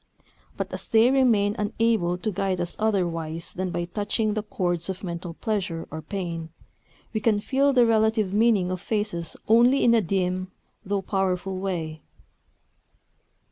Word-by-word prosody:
But -, -, -4 dB
as -, -, -5 dB
they 230 Hz, +2 st, +5 dB
remain 225 Hz, -6 st, +3 dB
unable 210 Hz, -4 st, +1 dB
to 215 Hz, +4 st, -2 dB
guide 190 Hz, -1 st, -1 dB
us 175 Hz, 0 st, -2 dB
otherwise 170 Hz, -6 st, -1 dB
than 185 Hz, 0 st, -2 dB
by 175 Hz, -1 st, -2 dB
touching 210 Hz, +3 st, -1 dB
the 215 Hz, -, -1 dB
chords 175 Hz, -4 st, -2 dB
of 190 Hz, +1 st, -5 dB
mental 170 Hz, -1 st, -5 dB
pleasure 185 Hz, -7 st, -2 dB
or 160 Hz, +1 st, -5 dB
pain, 165 Hz, -1 st, -5 dB, 0.6 s
we 215 Hz, -, 0 dB
can 215 Hz, -1 st, +2 dB
feel 275 Hz, +6 st, +2 dB
the 250 Hz, -3 st, +5 dB
relative 220 Hz, -3 st, +2 dB
meaning 210 Hz, -4 st, +3 dB
of 185 Hz, -1 st, -3 dB
faces 205 Hz, -7 st, -3 dB
only 240 Hz, +5 st, +5 dB
in 235 Hz, -, +5 dB
a 230 Hz, -, +5 dB
dim, 185 Hz, 0 st, -1 dB, 0.3 s
though 200 Hz, -1 st, -1 dB
powerful 190 Hz, -1 st, -1 dB
way. 165 Hz, -5 st, -3 dB
195 Hz, 150 wpm, -25 LUFS, 175-220 Hz, 0.6 s, they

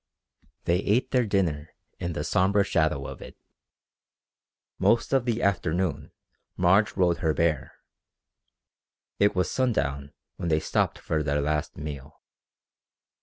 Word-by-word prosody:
They 85 Hz, +1 st, +2 dB
ate 110 Hz, +6 st, +1 dB
their 125 Hz, -3 st, +2 dB
dinner 80 Hz, -7 st, -1 dB, 0.2 s
in 85 Hz, -1 st, -3 dB
the -, -, -3 dB
sombre 100 Hz, +2 st, +2 dB
shadow 80 Hz, -7 st, 0 dB
of -, -, -8 dB
it. -, -, -11 dB, 1.4 s
Most 115 Hz, +3 st, +2 dB
of 135 Hz, -3 st, +3 dB
the 120 Hz, -1 st, -1 dB
afternoon 90 Hz, -3 st, 0 dB, 0.5 s
Marge 95 Hz, +5 st, +3 dB
rode 90 Hz, -3 st, +3 dB
her 80 Hz, -3 st, 0 dB
bear. 80 Hz, -4 st, 0 dB, 1.5 s
It 100 Hz, 0 st, +3 dB
was 90 Hz, -, 0 dB
sundown 70 Hz, -, -1 dB, 0.3 s
when 85 Hz, -3 st, -3 dB
they 80 Hz, -1 st, +3 dB
stopped -, -, 0 dB
for 80 Hz, -1 st, -2 dB
their 75 Hz, 0 st, 0 dB
last 75 Hz, +1 st, -2 dB
meal. 75 Hz, -1 st, -8 dB
85 Hz, 125 wpm, -26 LUFS, 75-100 Hz, 1.5 s, of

